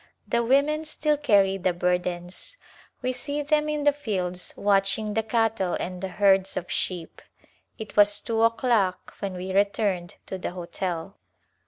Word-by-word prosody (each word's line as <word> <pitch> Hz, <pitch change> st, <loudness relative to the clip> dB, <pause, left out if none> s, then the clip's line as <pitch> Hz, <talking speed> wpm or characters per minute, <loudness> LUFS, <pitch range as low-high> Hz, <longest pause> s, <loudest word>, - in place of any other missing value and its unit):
The 235 Hz, -, +1 dB
women 280 Hz, +6 st, +2 dB
still 300 Hz, 0 st, 0 dB
carry 200 Hz, -9 st, +3 dB
the 185 Hz, -1 st, +1 dB
burdens. 180 Hz, -, -2 dB, 0.5 s
We 255 Hz, 0 st, 0 dB
see 285 Hz, +4 st, -3 dB
them 300 Hz, +1 st, +1 dB
in 300 Hz, -1 st, -1 dB
the 290 Hz, 0 st, +5 dB
fields 185 Hz, -10 st, -3 dB
watching 200 Hz, +1 st, +2 dB
the 225 Hz, -, +2 dB
cattle 220 Hz, -5 st, 0 dB
and 180 Hz, 0 st, -5 dB
the 190 Hz, -, -2 dB
herds 195 Hz, 0 st, +2 dB
of 175 Hz, -, -4 dB
sheep. 175 Hz, -3 st, -3 dB, 0.6 s
It 220 Hz, -2 st, -8 dB
was 205 Hz, 0 st, +5 dB
two 225 Hz, -1 st, -1 dB
o'clock 230 Hz, -5 st, +1 dB
when 195 Hz, -2 st, -4 dB
we 185 Hz, +1 st, -5 dB
returned 200 Hz, -3 st, +1 dB
to 190 Hz, -, -5 dB
the 175 Hz, -, -4 dB
hotel. 180 Hz, +1 st, -4 dB
200 Hz, 155 wpm, -26 LUFS, 185-235 Hz, 0.6 s, the